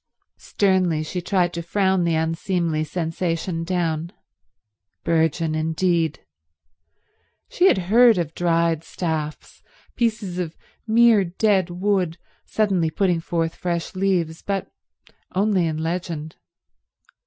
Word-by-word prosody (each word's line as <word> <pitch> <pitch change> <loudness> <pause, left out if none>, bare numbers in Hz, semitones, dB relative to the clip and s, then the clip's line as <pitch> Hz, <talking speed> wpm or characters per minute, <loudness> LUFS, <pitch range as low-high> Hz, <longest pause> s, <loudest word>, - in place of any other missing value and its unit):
Sternly 185 -5 +1
she 180 +3 -4
tried 175 -1 +1
to 170 - -3
frown 190 +1 +1
the 165 -1 +1
unseemly 165 0 -1
sensation 165 +1 -2
down. 165 -2 -1 0.9
Burgeon, 160 -1 +1
indeed. 160 0 0 1.2
She 365 - +3
had - - +4 0.2
heard 235 -3 +7
of 165 -3 -2
dried 165 -2 +1
staffs, 160 -3 -4 0.3
pieces 215 -6 -1
of 170 -2 -4 0.3
mere 225 -2 +5
dead 190 +1 +1
wood, 180 -2 0 0.3
suddenly 190 -7 +1
putting 175 +1 +1
forth 165 0 -2
fresh 170 -2 -3
leaves, 180 -4 0
but 195 -1 -3 0.6
only 195 -3 +2
in 155 -1 -2
legend. 160 -1 -4
175 Hz, 110 wpm, -22 LUFS, 165-190 Hz, 1.2 s, heard